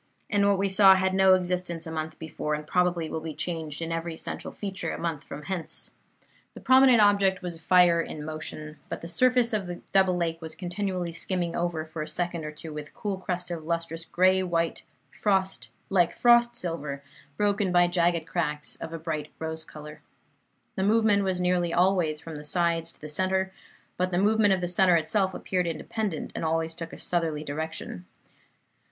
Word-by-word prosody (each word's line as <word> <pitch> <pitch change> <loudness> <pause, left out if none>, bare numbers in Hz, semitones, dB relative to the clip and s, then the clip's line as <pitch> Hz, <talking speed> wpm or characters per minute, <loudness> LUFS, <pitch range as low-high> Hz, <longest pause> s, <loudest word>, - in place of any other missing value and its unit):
And 200 -1 +3
what 200 - +3
we 195 +1 +1
saw 190 0 +7
had 190 0 +1
no 190 0 +6
existence 180 -2 -2
a 160 - -6
month 160 0 -4
before, 150 -1 -3
and 150 0 -6
probably 175 -1 +1
will 160 - -3
be 160 -2 -6
changed 160 -1 -4
in 165 - -4
every 165 0 -3
essential - - -6
feature 195 -2 -4
a - - -4
month 165 -4 -3
from 150 - -8
hence. 185 -1 -4 0.6
The - - -8
prominent 260 -2 +6
object 200 -3 +4
was 170 -2 -4
fire 175 -1 +5
in 150 -2 -6
motion; 155 -1 -7
but - - -5
the 165 - -7
surface 250 +4 +3
of 200 -4 -1
the 175 0 -6
double 190 -2 +3
lake 165 -1 -2
was 160 -1 -6
continually 180 -1 -3
skimming 175 0 -2
over 170 -2 -1
for 155 0 -6
a 155 - -4
second 170 0 -2
or 150 - -4
two 155 +1 -7
with 150 -1 -6
a - - -21
cool 200 -3 -3
crust 180 -1 -3
of 165 -2 -4
lustrous 165 0 -3
grey 185 +2 +3
white, 170 -2 -1 1.1
like 175 -3 +2
frost 240 0 +5
silver, 150 -7 -4 0.3
broken 205 -2 +1
by 175 0 +5
jagged 175 -2 +1
cracks 150 -4 -2
of 165 0 -7
a - - -3
bright 155 -2 -4
rose 160 0 -4
color. 150 0 -11 0.7
The - - -2
movement 210 -1 +3
was 185 -2 0
nearly 180 -1 +1
always 175 -3 +2
from 160 0 -8
the 150 - -8
sides 165 +1 0
to - - -16
the 150 - -8
centre; 190 +4 0 0.4
but 180 0 +1
the 175 - -1
movement 210 +1 +4
of 185 - -5
the 175 - -1
centre 180 0 +4
itself 185 +4 +1
appeared 180 -2 -1
independent, 180 +2 -3
and - - -4
always 165 0 0
took 165 0 -7
a - - -9
southerly 165 -4 -1
direction. 150 - -5
175 Hz, 190 wpm, -27 LUFS, 160-190 Hz, 1.1 s, saw